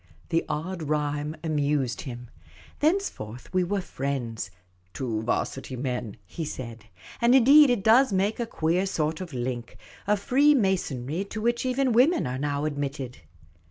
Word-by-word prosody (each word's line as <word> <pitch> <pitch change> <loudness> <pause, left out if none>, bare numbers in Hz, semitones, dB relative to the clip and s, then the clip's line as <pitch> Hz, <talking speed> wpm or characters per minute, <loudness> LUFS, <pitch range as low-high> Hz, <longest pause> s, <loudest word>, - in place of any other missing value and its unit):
The 165 - +1
odd 170 +4 -3
rhyme 150 0 -1
amused 145 -5 0
him. 120 -1 -9 0.5
Thenceforth 290 - -1
we 185 0 +3
were 195 +2 -1
friends 125 - -4
— 90 0 -38
" 90 0 -38
two 115 -5 -2
'Varsity 130 +3 -2
men," 125 -4 -3
he 165 - -6
said. 115 -7 -7 0.4
And 240 +2 +5
indeed 275 +3 +8
it 240 -6 +1
does 230 +3 +5
make 200 +4 +1
a 235 - -1
queer 175 +1 0
sort 155 -2 -1
of 180 -3 -6
link 120 -2 -4 0.2
— - - -22
a 210 0 +3
freemasonry 195 - +2
to 210 +2 -6
which 235 +3 0
even 255 0 +1
women 275 +10 +4
are 125 +1 -3
now 145 +1 -1
admitted. 140 -3 -4
155 Hz, 160 wpm, -26 LUFS, 130-210 Hz, 0.5 s, indeed